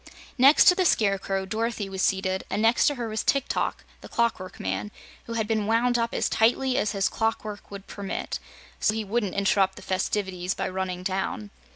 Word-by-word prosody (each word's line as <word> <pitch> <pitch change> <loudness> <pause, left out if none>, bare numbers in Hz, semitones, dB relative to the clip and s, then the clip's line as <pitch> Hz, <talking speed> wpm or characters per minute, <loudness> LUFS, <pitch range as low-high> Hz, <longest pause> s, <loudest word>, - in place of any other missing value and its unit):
Next 275 +4 +7
to - - +9
the 370 - +1
Scarecrow, 195 - +1
Dorothy 220 +1 -2
was 190 -1 -4
seated, 190 -1 0
and 200 - -1
next 225 +2 +4
to 290 - +2
her 240 -3 -4
was 220 0 -2
Tik 275 - +1
Tok, - - -2 0.2
the - - -11
Clockwork 225 -6 -1
Man, 95 +2 -3 0.4
who 230 - -6
had 220 -2 -1
been 215 -2 0
wound 240 +2 +2
up 230 0 0
as - - 0
tightly 250 +3 +2
as 210 -3 0
his 195 -1 +1
clockwork 220 -2 -3
would 200 -1 -9
permit, 200 -1 -5 0.4
so 215 - +2
he 220 -1 -2
wouldn't 205 -2 -1
interrupt 195 -1 +2
the - - -11
festivities 185 -1 -2
by - - -2
running 185 -1 -3
down. 185 - -3
205 Hz, 195 wpm, -26 LUFS, 190-230 Hz, 0.4 s, to